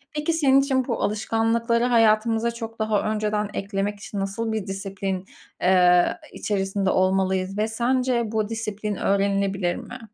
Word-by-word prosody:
Peki, 300 +2 0
senin 275 -4 +4
için 265 -2 0
bu 235 - -2
alışkanlıkları 225 +3 +1
hayatımıza 225 0 +3
çok 225 -1 -8
daha 215 -1 +1
önceden 210 -1 -1
eklemek 200 +1 -3
için 205 -1 -6
nasıl 200 +4 -2
bir 215 -3 -3
disiplin, 195 -1 -4 0.4
eee, 180 -1 +4 0.2
içerisinde 195 -1 -1
olmalıyız 190 0 +1
ve 215 +1 +1
sence 245 +2 +1
bu 215 -1 -1
disiplin 215 -2 -3
öğrenilebilir 195 -2 0
mi? 250 +1 -8
210 Hz, 135 wpm, -24 LUFS, 195-230 Hz, 0.4 s, senin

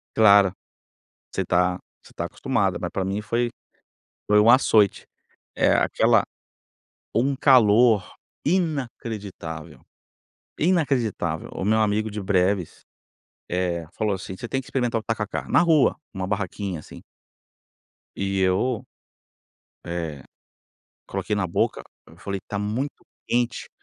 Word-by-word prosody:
Claro, 100 -3 +6 0.8
você 95 - -1
tá 90 +1 +1 0.2
você - - -18
tá - - -3
acostumada, - - -1
mas - - -3
pra 95 - -2
mim 100 +2 -2
foi 120 +3 0 0.8
foi 105 0 +4
um 105 - +4
açoite. 110 -5 +4 0.5
Eh, - - +3
aquela - - +3 0.9
um 135 +4 +1
calor 115 -5 +5 0.4
inacreditável, 115 - -3 0.8
inacreditável. 130 - 0
O 95 - -4
meu 110 +2 +3
amigo 110 +1 +1
de 105 0 -5
Breves, 95 -2 0 0.6
eh, 85 -2 -1
falou 105 -2 -1
assim: 95 0 -7
"Você 120 - -7
tem 135 +4 -1
que 130 - -14
experimentar 120 -3 -1
o - - -16
tacacá 110 -2 -3
na - - +4
rua, 160 -5 +4 0.2
uma 95 -3 -4
barraquinha 100 -2 -3
assim". - - -12 1.2
E 95 0 -1
eu 110 +7 +1 1.0
eh, 80 -5 -4 0.8
coloquei 100 +2 -2
na 100 -3 0
boca, 85 - 0 0.3
eu 80 - -17
falei: 100 +2 -4
"Tá 100 - -3
muito 115 +8 -3 0.2
quente, 120 0 -1
105 Hz, 125 wpm, -24 LUFS, 95-120 Hz, 1.2 s, Claro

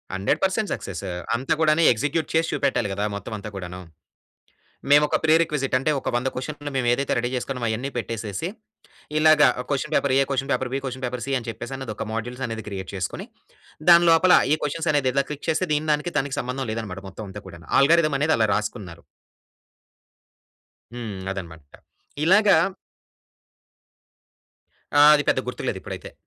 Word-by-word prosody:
100% 190 - 0
success! 95 - -6 0.3
అంత 130 +3 -4
కూడాను 155 +1 +4
execute 145 +8 -2
చేసి 165 0 +2
చూపెట్టాలి 130 -6 0
కదా! 100 +1 -2
మొత్తం 100 +2 -7
అంతా 105 +1 -7
కూడాను. 90 -1 -7 1.1
మేము 145 +1 +7
ఒక - - +1
ప్రి-రిక్విజిట్ 155 -4 +2
అంటే 135 +4 0
ఒక - - -3
100 120 +2 0
క్వశ్చన్‌లు 145 +2 -5
మేము 125 -2 0
ఏదైతే 140 +2 -1
రెడీ 120 - -1
చేసుకున్నామో! 125 -1 -3
అయన్నీ 120 +5 -2
పెట్టేసేసి. 115 - -4 0.7
ఇలాగ 155 -1 +5 0.3
క్వశ్చన్ 145 +3 -2
పేపర్ 140 -2 +2
ఏ - - +5
question 135 0 -1
paper 130 -1 -1
B 135 - 0
question 130 0 -6
paper 125 -1 -4
C 140 - -3
అని 115 - -11
చెప్పేసి 130 +3 -6
ఒక - - -4
మోడ్యుల్స్ 120 +3 -4
అనేది 110 -2 -6
క్రియేట్ 95 -1 -6
చేసుకొని, 95 - -4 0.6
దానిలోపల 170 +1 +6 0.2
ఈ - - +5
క్వశ్చన్స్ 155 +3 -2
అనేది 135 -3 +1 0.2
క్లిక్ 150 - -7
చేస్తే 170 +3 0
దీని 155 +1 -1
దానికి 150 +4 -3
దానికి 135 0 -3
సంబంధం 125 +1 -4
లేదన్నమాట 100 -4 -5
మొత్తం 105 +4 -8
అంతా 105 +2 -8
కూడాను. 85 -3 -12
ఆల్గారిథమ్ 155 0 +4
అనేది 155 +2 +2
అలా 110 -1 +3
రాసుకున్నారు. 105 -6 -5 1.9
హ్మ్. 115 -5 -6
అదన్నమాట. 85 -5 -7 0.6
ఇలాగ 200 +5 +5 2.5
ఆ! - - +8
అది 145 - 0
పెద్ద - - +2
గుర్తులేదు - - -3
ఇప్పుడైతే. - - -8
130 Hz, 155 wpm, -23 LUFS, 110-150 Hz, 2.5 s, ఆ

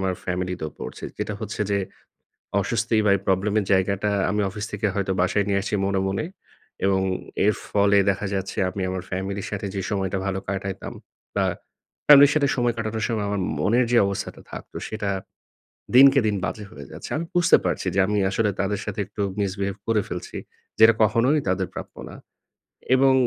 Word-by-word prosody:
আমার 95 -1 0
ফ্যামিলি 90 0 -2
তেও 80 - -3
পড়ছে। - - -7
যেটা 105 - -3
হচ্ছে 110 -1 -5
যে 100 - +2 0.8
অস্বস্তি 115 +3 0
বা - - +5
এই - - -7
প্রবলেম 95 +2 +1
এর - - -3
জায়গাটা 100 +2 +2 0.2
আমি 105 +1 0
অফিস 105 +1 -5
থেকে 105 +1 -1
হয়তো 100 -1 0
বাসায় 95 +3 +2
নিয়ে 100 -1 +2
আসছি - - -3
মনে, 100 -1 +1
মনে 95 +7 -1 0.6
এবং 95 -1 +3 0.5
এর 105 - +4
ফলে 100 0 +4
দেখা 100 +1 -2
যাচ্ছে 95 0 -3
আমি 95 - -4
আমার 95 -1 -3
ফ্যামিলির 95 +1 -3
সাথে 100 -1 -3
যে 100 - -1
সময়টা 95 -1 -1
ভালো 95 0 -1
কাটাইতাম 95 -1 -4 0.4
বা - - +3 0.6
ফ্যামিলির 145 -1 +9
সাথে 145 -2 +3
সময় 120 -2 +1
কাটানোর 110 -1 -2
সময় 110 -3 -1
আমার 100 -1 -1 0.2
মনের 120 +10 +3
যে 120 - +6
অবস্থাটা 100 -1 -4
থাকত - - -9 0.2
সেটা 105 -2 -3 0.9
দিনকে 135 +1 +8
দিন 105 - +1
বাজে 105 -1 -5
হয়ে 70 - -10
যাচ্ছে। - - -8
আমি 165 - -3
বুঝতে 175 0 +6
পারছি - - -1
যে - - +2
আমি 105 0 0
আসলে 105 0 +1
তাদের 100 +1 -1
সাথে 105 -1 -5
একটু 105 +1 -6 0.2
misbehave 100 0 -2
করে 110 -2 +2
ফেলছি। 90 - -6 0.4
যেটা 110 +1 +8
কখনোই 120 +8 +3
তাদের 95 - 0
প্রাপ্য - - -7
না। - - -10 0.8
এবং 135 0 +5
100 Hz, 180 wpm, -24 LUFS, 95-110 Hz, 0.9 s, ফ্যামিলির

